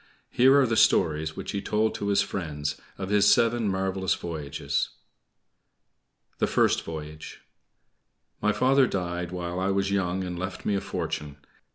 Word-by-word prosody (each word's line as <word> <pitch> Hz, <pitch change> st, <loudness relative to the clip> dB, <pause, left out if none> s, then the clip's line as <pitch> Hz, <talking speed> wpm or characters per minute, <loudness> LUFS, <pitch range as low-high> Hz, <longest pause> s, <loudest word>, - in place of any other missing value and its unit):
Here 135 Hz, +3 st, +5 dB
are 135 Hz, -, +4 dB
the 115 Hz, -2 st, 0 dB
stories 80 Hz, 0 st, +3 dB
which 95 Hz, -1 st, -5 dB
he 100 Hz, -, -3 dB
told 110 Hz, +2 st, 0 dB
to 100 Hz, -, -4 dB
his 100 Hz, -1 st, +3 dB
friends 75 Hz, -5 st, -4 dB, 0.2 s
of 95 Hz, -1 st, -5 dB
his 105 Hz, 0 st, +5 dB
seven 115 Hz, -1 st, +3 dB
marvelous 95 Hz, -1 st, 0 dB
voyages. 75 Hz, -5 st, -3 dB, 1.5 s
THE -, -, +2 dB
FIRST -, -, +2 dB
VOYAGE 75 Hz, -1 st, -8 dB, 1.0 s
My 105 Hz, -, +3 dB
father 130 Hz, +3 st, +3 dB
died 90 Hz, -3 st, -3 dB
while 90 Hz, 0 st, -4 dB
I 95 Hz, +1 st, 0 dB
was 100 Hz, 0 st, 0 dB
young 95 Hz, -1 st, 0 dB
and 90 Hz, -1 st, -5 dB
left 95 Hz, 0 st, -5 dB
me 105 Hz, -, +1 dB
a 100 Hz, -, 0 dB
fortune. 75 Hz, -1 st, -4 dB
95 Hz, 155 wpm, -26 LUFS, 85-100 Hz, 1.5 s, Here